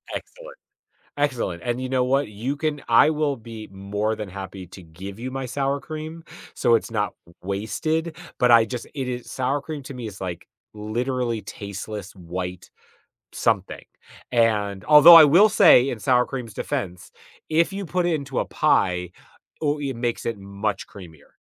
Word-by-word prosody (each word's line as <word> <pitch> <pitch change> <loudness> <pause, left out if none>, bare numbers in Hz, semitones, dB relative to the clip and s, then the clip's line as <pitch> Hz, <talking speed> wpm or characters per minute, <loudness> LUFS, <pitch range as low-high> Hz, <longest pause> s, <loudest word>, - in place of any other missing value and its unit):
Excellent, - - -9 0.6
excellent, 125 -12 -1
and 120 +1 -2
you 130 - -3
know 130 -1 +1
what, 135 0 +1
you 120 +8 -4
can 150 -1 -2
I 115 +6 +6
will 150 -2 0
be 110 -2 -10
more 100 +3 -2
than 105 -2 -6
happy 95 -1 -8
to 95 - -12
give 95 +5 -10
you 125 +2 -5
my 135 0 -4
sour 140 +2 -1
cream, 155 +2 -7 0.3
so 120 - +3
it's 115 - 0
not 105 -3 -1
w 85 - -19
wasted, 155 - -2 0.2
but 125 - +3
I 115 -1 +7
just, 120 +1 -6
it 135 -3 -3
is 125 -1 -5
sour 135 +2 -1
cream 150 0 -7
to 135 - -8
me 125 -3 -6
is 100 -2 -9
like 90 -3 -5 0.3
literally 120 +2 -2
tasteless, 100 0 -7
white 90 0 -6 0.6
something, - - -1 0.5
and 105 -5 +1
although 150 +3 +10
I 165 - +11
will 180 +9 +6
say 160 - +6
in 120 - -4
sour 125 +3 +3
cream's 125 -5 -6
defense, 90 -2 -4 0.4
if 165 +4 +2
you 195 0 -4
put 180 +1 -1
it 175 - +1
into 140 -4 -3
a - - 0
pie, 90 -1 +1 0.5
ooh 150 0 0
it 135 -3 -3
makes 120 0 -3
it 115 -2 -2
much 100 +1 -4
creamier. 85 -7 -14
120 Hz, 175 wpm, -23 LUFS, 100-145 Hz, 0.6 s, I